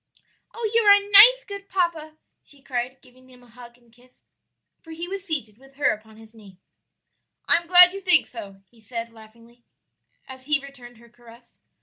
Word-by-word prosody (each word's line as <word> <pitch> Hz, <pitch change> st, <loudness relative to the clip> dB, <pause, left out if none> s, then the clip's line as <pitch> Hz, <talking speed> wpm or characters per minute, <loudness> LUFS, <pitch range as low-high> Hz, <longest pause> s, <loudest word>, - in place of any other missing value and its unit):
"Oh, 460 Hz, -1 st, -4 dB
you 465 Hz, -, +2 dB
are 405 Hz, -2 st, +6 dB
a 405 Hz, 0 st, -4 dB
nice, -, -, +7 dB
good 400 Hz, 0 st, -11 dB
papa!" 330 Hz, -4 st, -4 dB, 0.3 s
she 280 Hz, -2 st, -20 dB
cried, 255 Hz, 0 st, -6 dB
giving 255 Hz, 0 st, -23 dB
him 250 Hz, -1 st, -20 dB
a -, -, -21 dB
hug 240 Hz, 0 st, -17 dB
and 240 Hz, -2 st, -30 dB
kiss, 250 Hz, +1 st, -27 dB, 0.6 s
for 325 Hz, -, -20 dB
he 335 Hz, +2 st, -8 dB
was 390 Hz, 0 st, -7 dB
seated 265 Hz, -, -6 dB
with 270 Hz, +1 st, -22 dB
her 285 Hz, -, 0 dB
upon 215 Hz, 0 st, -11 dB
his 220 Hz, 0 st, -18 dB
knee. 205 Hz, -5 st, -18 dB, 0.9 s
"I -, -, +3 dB
am 340 Hz, 0 st, -8 dB
glad 360 Hz, +1 st, +7 dB
you 395 Hz, -, -9 dB
think 360 Hz, -4 st, +2 dB
so," 200 Hz, -5 st, -13 dB
he 230 Hz, -2 st, -25 dB
said, 230 Hz, +1 st, -8 dB
laughingly, 230 Hz, +2 st, -20 dB, 0.6 s
as 260 Hz, 0 st, -14 dB
he 300 Hz, 0 st, 0 dB
returned 250 Hz, -4 st, -15 dB
her 235 Hz, +1 st, -20 dB
caress. 235 Hz, 0 st, -21 dB
255 Hz, 195 wpm, -22 LUFS, 235-340 Hz, 0.9 s, nice